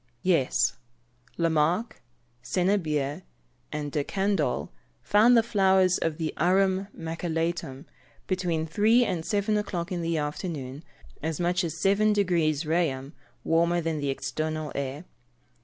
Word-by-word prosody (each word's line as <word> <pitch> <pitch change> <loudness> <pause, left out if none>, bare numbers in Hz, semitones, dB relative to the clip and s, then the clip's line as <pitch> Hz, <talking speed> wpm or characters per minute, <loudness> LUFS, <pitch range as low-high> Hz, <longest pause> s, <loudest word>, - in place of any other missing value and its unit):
_ - - -42 0.2
Yes. 165 -8 +2 0.6
Lamarck, 170 +7 +1 0.4
Senebier, 155 -2 0 0.5
and 150 -1 -4
De 145 -1 0
Candolle, 170 - -1 0.3
found 230 +4 +5
the 230 - +5
flowers 190 -4 +3
of 160 -2 -1
the 160 -2 -2
Arum 190 +2 +2
Maculatum, 165 -3 -3 0.4
between 175 -4 -1
three 220 +9 +3
and 170 -6 -2
seven 205 +3 0
o'clock 185 -3 -3
in 175 -1 -2
the 165 -1 -1
afternoon, 150 -2 -4 0.4
as 160 0 -3
much 175 +1 +1
as 165 -3 -3
7 210 +2 +3
deg. 200 -2 +1
Reaum. 155 -3 0 0.3
warmer 170 +1 +2
than 165 -2 -2
the 140 -1 -2
external 155 +4 -3
air. 140 +4 -4
170 Hz, 125 wpm, -27 LUFS, 150-190 Hz, 0.6 s, found